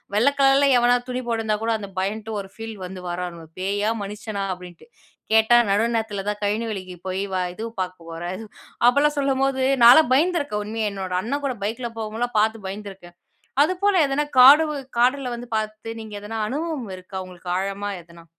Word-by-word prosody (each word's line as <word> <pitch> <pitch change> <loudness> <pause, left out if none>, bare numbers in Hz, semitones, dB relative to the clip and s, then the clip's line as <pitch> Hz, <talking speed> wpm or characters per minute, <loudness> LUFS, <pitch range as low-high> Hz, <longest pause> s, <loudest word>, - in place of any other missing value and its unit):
வெள்ளை 240 +7 +4
கலரில 275 +1 +5
எவனாது 245 0 +3
துணி 250 0 -2
போட்டுருந்தா 225 -2 0
கூட, 230 0 +1
அந்த 200 -2 -7
பயந்துட்டு, 215 +3 -3
ஒரு 195 - -12
ஃபீல் 225 0 -7
வந்து, 185 0 -8
வாரானுவ 175 -1 -5
பேயா? 205 +3 0
மனுஷனா? 205 0 -5
அப்படின்ட்டு. 180 - -13 0.4
கேட்டா 220 +2 +6
நடு 200 +2 +3
நேரத்தில 220 -3 -2
தான் 210 0 -4
கழனி 210 +3 0
வேலைக்கு 185 -4 -6
போய் 185 +1 -2
வா 185 - +1
இதுவும் 225 +3 -7
பார்க்க 180 -2 -6
போற, 165 +1 -7 0.6
அப்போலாம் 285 +4 +4
சொல்லும்போது, 270 -1 +1 0.2
நான்லாம் 255 +2 +8
பயந்துருக்கேன், 290 -7 +1
உண்மையா. 215 0 -2
என்னோடய 185 -2 -2
அண்ணன் 280 +8 -3
கூட 260 -2 -1
பைக்கில 235 +3 -3
போகும்போதுலாம் 225 +2 -3
பார்த்து 220 -1 -1
பயந்துருக்கேன், 195 -3 -9 0.5
அதுபோல 370 +5 +1
எதனா 280 +2 0
காடுகள் 285 +1 +7
காடுல 255 +2 +2
வந்து 240 0 -9
பார்த்து 215 +1 -5
நீங்க 220 -1 -10
எதனா 215 +2 -6
அனுபவம் 290 - -3
இருக்கா 185 +1 -9
உங்களுக்கு, 180 -1 -8
ஆழமா 200 +1 -3
எதனா? 170 0 -16
220 Hz, 165 wpm, -23 LUFS, 195-255 Hz, 0.6 s, நான்லாம்